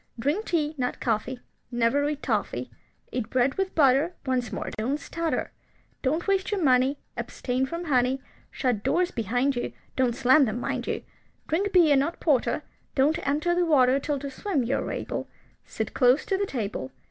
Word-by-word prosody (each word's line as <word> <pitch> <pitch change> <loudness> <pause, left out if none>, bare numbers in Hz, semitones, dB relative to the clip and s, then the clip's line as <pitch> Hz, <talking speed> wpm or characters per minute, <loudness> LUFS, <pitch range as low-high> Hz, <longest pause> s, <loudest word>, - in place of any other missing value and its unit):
Drink 295 - 0
tea, 310 -3 0
not 250 -1 -1
coffee; 240 +2 -1 0.3
Never 240 +4 +2
eat 300 -1 -4
toffy. - - -1 0.4
Eat 240 -3 -3
bread 255 +2 +2
with 385 +2 -2
butter. 290 +4 +4
Once 255 -3 0
more, - - -4
don't 255 +7 -1
stutter. 330 +3 -2 0.5
Don't 310 +6 0
waste 390 -1 +1
your 400 -4 0
money, 260 +1 +4 0.2
Abstain 255 +1 -2
from 335 +4 -4
honey. 260 -2 +2 0.3
Shut 245 -6 -1
doors 360 - +1
behind 245 +4 0
you, 240 - -3 0.2
(Don't 250 -3 +1
slam 265 +3 +5
them, 225 +1 -2
mind - - -3
you.) - - -2 0.4
Drink 380 +6 0
beer, 335 -6 +6
not 285 +5 0
porter. 285 -7 +1 0.3
Don't 290 +3 +3
enter 300 +5 +1
the 355 0 +2
water 270 -5 +4
Till 290 +1 -1
to 280 0 -6
swim 295 0 -1
you 255 +4 0
are - - -3
able. - - -4 0.4
Sit - - -4
close 255 +2 +4
to 390 - 0
the 400 +1 0
table. 200 - -4
275 Hz, 175 wpm, -26 LUFS, 250-320 Hz, 0.5 s, beer